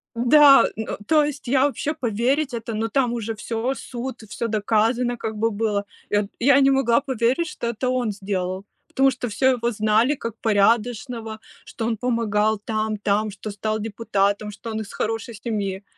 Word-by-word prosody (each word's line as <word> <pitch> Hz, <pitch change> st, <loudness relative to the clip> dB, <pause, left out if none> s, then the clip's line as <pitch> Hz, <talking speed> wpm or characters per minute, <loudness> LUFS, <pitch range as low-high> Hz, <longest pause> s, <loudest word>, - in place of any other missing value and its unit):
Да, 275 Hz, +4 st, +7 dB
н 220 Hz, -, -4 dB
то 310 Hz, -1 st, +4 dB
есть 290 Hz, -2 st, -4 dB
я 265 Hz, +2 st, +3 dB
вообще 290 Hz, +2 st, -1 dB
поверить 255 Hz, +4 st, 0 dB
это 230 Hz, -1 st, -4 dB
Но 220 Hz, +1 st, -1 dB
там 250 Hz, -1 st, +1 dB
уже 225 Hz, -1 st, -3 dB
всё, 230 Hz, +4 st, -2 dB
суд, 250 Hz, -1 st, -6 dB
всё 220 Hz, +2 st, -4 dB
доказано 225 Hz, +3 st, +1 dB
как 220 Hz, -1 st, -4 dB
бы 225 Hz, +2 st, 0 dB
было. 205 Hz, -1 st, -1 dB, 0.3 s
Я 205 Hz, -1 st, +1 dB
я 275 Hz, +3 st, +5 dB
не 270 Hz, 0 st, +5 dB
могла 270 Hz, -2 st, +3 dB
поверить, 260 Hz, +4 st, 0 dB
что 235 Hz, -, -5 dB
это 235 Hz, +2 st, -2 dB
он 250 Hz, -3 st, 0 dB
сделал, 190 Hz, -1 st, -3 dB, 0.2 s
потому 270 Hz, 0 st, +3 dB
что 255 Hz, -1 st, -4 dB
всё 225 Hz, +4 st, -2 dB
его 235 Hz, 0 st, -1 dB
знали 220 Hz, +5 st, +2 dB
как 230 Hz, -5 st, -6 dB
порядочного, 225 Hz, +2 st, +1 dB, 0.3 s
что 225 Hz, -, -5 dB
он 230 Hz, 0 st, 0 dB
помогал 220 Hz, -3 st, 0 dB
там, 215 Hz, -1 st, -1 dB
там, 210 Hz, +1 st, 0 dB
что 210 Hz, +2 st, -7 dB
стал 215 Hz, +2 st, -2 dB
депутатом, 210 Hz, -1 st, -1 dB
что 215 Hz, +3 st, -8 dB
он 220 Hz, -, -3 dB
из 210 Hz, -, -9 dB
хорошей 225 Hz, +1 st, -3 dB
семьи 200 Hz, -4 st, -3 dB
225 Hz, 175 wpm, -23 LUFS, 215-250 Hz, 0.3 s, Да